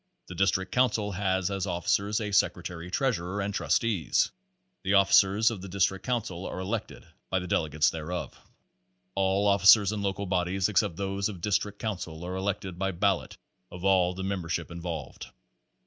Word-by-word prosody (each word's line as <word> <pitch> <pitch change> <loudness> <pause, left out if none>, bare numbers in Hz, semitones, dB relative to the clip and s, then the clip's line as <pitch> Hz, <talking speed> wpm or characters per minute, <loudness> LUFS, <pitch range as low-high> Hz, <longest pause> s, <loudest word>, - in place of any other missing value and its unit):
The - - -6
District 95 0 +1
Council 115 -5 +1
has 95 0 0
as 95 -2 -2
officers 100 +4 0
a 105 -2 -3
sec 100 - +3
retary 90 0 -7
treasurer 105 -6 -1
and 100 +1 -2
trustees. 100 - +1 0.5
The 95 +1 +1
officers 100 +3 +5
of 105 -5 -6
the 100 - -7
dis 95 0 +3
trict 95 0 -4
council 100 -7 -3
are - - -6
elected 100 +4 -4 0.2
by 95 - +1
the 90 - -3
delegates 75 -3 +1
thereof. 80 +2 -5 0.8
All 95 +1 +1
officers 100 +1 +6
in 105 -1 -3
local 100 0 -2
bodies 90 +1 0
except 95 -4 +1
those 100 +2 -2
of 95 -4 -7
district 105 +2 -1
council 90 -7 -5
are 90 +1 -4
elected 95 -2 -3
by 95 0 -1
ballot 95 +1 0 0.3
of 90 +1 -7
all 90 -2 +3
the 95 - -5
membership 90 -4 -3
in 85 0 -7
volved. 85 -1 -6
95 Hz, 170 wpm, -28 LUFS, 90-100 Hz, 0.8 s, officers